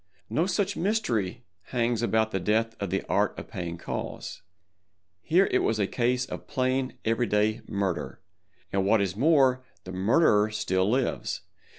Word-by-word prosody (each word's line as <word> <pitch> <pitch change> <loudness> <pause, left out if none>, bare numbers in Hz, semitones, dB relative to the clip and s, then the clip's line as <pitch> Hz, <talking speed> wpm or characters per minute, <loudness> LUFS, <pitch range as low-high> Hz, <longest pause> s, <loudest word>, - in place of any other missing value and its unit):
No 165 +4 +1
such 195 +1 0
mystery 125 - -1 0.2
hangs 120 -2 0
about 110 -1 +1
the 95 - -1
death 110 +4 +1
of 100 - -2
the 95 +2 -1
Art - - 0
of - - -8
Paying 85 -1 -5
Calls. - - -5 0.8
Here 180 - +3
it - - +3
was 110 - +1
a 105 - +2
case 125 +4 0
of - - -8
plain 130 -1 -1
every 115 +2 +1
day 105 +2 +1
murder—and 95 -1 -4
what 105 +3 +4
is 95 -2 -1
more, 135 -1 +4 0.2
the 90 - -8
murderer 105 - +3
still 100 -3 0
lives. 125 +2 -1
110 Hz, 155 wpm, -27 LUFS, 100-130 Hz, 0.8 s, what